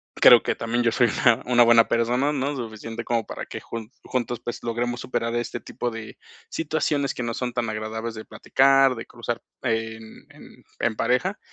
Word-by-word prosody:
creo - - +8
que - - 0
también 120 +1 -1
yo 115 - +3
soy 120 +1 +3 0.2
una 120 -3 +5
una 120 -1 +5
buena 115 -1 +6
persona, 125 +5 +1
¿no? 140 +1 -1
Suficiente 115 -1 -6
como 115 -2 0
para - - -6
que - - -7
jun 115 -2 -7
juntos, 120 -2 -3
pues, 120 - -5
logremos 120 +1 -2
superar 115 -2 -2
este 120 0 -3
tipo 120 - -4
de 110 -1 -8 0.3
situaciones 150 -3 -1
que 125 - -4
no 115 0 -2
son 125 0 -3
tan 120 -2 -1
agradables 110 +1 -4
de 110 - -8
platicar, 135 -1 +3
de 115 - -7
cruzar 120 0 -5 0.2
en 110 -1 -3
en - - -16 0.2
en 115 - 0
pareja. 150 - 0
120 Hz, 185 wpm, -24 LUFS, 115-125 Hz, 0.3 s, creo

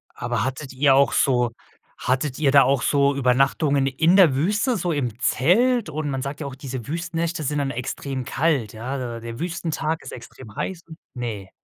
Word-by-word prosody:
Aber - - -2
hattet 135 +1 -5
ihr 135 +1 +4
auch 140 +1 +4
so 125 -3 +2 0.5
hattet 130 +1 -1
ihr 150 -3 +3
da 140 0 +7
auch 135 0 +2
so 140 +1 +2
Übernachtungen 135 +2 +2
in 160 +7 +3
der 175 -9 +6
Wüste, 210 - +1
so 175 0 -1
im 125 -8 -2
Zelt? 220 - +2
Und 155 0 -3
man 135 -2 -3
sagt 140 +3 -5
ja 150 - -4
auch, 135 - -6
diese 130 -3 -7
Wüstennächte 170 0 -2
sind 150 +1 -1
dann 140 -1 -1
extrem 130 +1 -4
kalt, 135 -7 0
ja? 120 0 -5
Der 115 0 -7
Wüstentag 165 -2 -3
ist - - -9
extrem 110 -5 -11
heiß 180 -3 -4 0.3
Ne. 110 -6 -5
140 Hz, 180 wpm, -23 LUFS, 130-160 Hz, 0.5 s, da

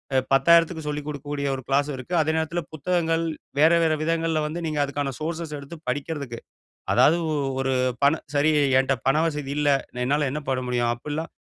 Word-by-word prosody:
அ - - +5 0.2
₹10,000க்கு 160 +3 +4
சொல்லிக் 150 0 -4
கொடுக்கக்கூடிய, 145 -1 -4
ஒரு 130 - -6
கிளாஸ் 140 +2 +1
இருக்கு. 130 +6 -8
அதே 155 +1 +1
நேரத்துல 160 +2 -1
புத்தகங்கள். 165 +1 0 0.4
வேற 160 +2 +6
வேற 160 -1 +3
விதங்கள்ல 165 -1 0
வந்து 160 +3 -4
நீங்க 155 -1 -2
அதுக்கான 140 -1 -2
சோர்ஸஸ்ஸ 160 -1 -4
எடுத்து 140 +4 -9
படிக்கிறதுக்கு. 140 -3 -4 0.6
அதாது 160 - +5 0.4
ஒரு 135 0 0 0.3
பண 140 - +6 0.2
சரி 150 +2 +3 0.3
என்ட்ட 135 +1 +1
பண 135 - +4
வசதி 150 -3 -3
இல்ல, 150 -1 +2 0.4
என்னால 145 +2 +1
என்ன 150 - -3
பண்ண 130 -1 0
முடியும் 120 -1 +1
அப்படிலாம் 150 +6 -5
150 Hz, 165 wpm, -24 LUFS, 140-160 Hz, 0.6 s, வேற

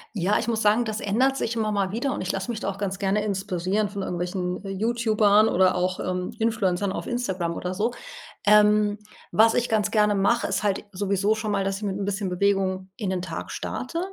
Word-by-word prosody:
Ja, 195 +2 +1
ich - - -3
muss 225 -1 0
sagen, 215 +3 +3
das 215 0 -3
ändert 260 +7 +1
sich 230 +1 -2
immer 215 -1 0
mal 195 -2 0
wieder 250 +6 -1
und - - -4
ich 185 - -1
lasse 195 +4 -4
mich 230 -2 -3
da - - -2
auch 195 - -5
ganz 195 -1 -3
gerne 200 +1 0
inspirieren 195 0 -1
von 200 -1 -5
irgendwelchen 180 +1 -3 0.2
YouTubern 220 -2 +3
oder 185 +1 +3
auch, 185 +1 -1
ähm, 180 0 -2
Influencern 205 -4 0
auf - - -5
Instagram 190 -9 -2
oder 180 0 -3
so. 215 +6 0 0.5
Ähm, 210 0 +5 0.3
was 225 +1 +5
ich 245 0 0
ganz 210 -2 +1
gerne 210 -2 +3
mache, 220 +5 +2
ist 190 +1 -1
halt 200 0 0
sowieso 200 +2 0
schon 215 -1 -3
mal, 195 -1 +1
dass 195 0 -1
ich 210 - -9
mit 195 -1 -2
'n 200 - -3
bisschen 200 -1 -2
Bewegung 190 0 0
in 210 -5 -3
den 185 -1 -1
Tag 170 -2 -6
starte. 330 +7 -4
205 Hz, 215 wpm, -25 LUFS, 190-220 Hz, 0.5 s, Ähm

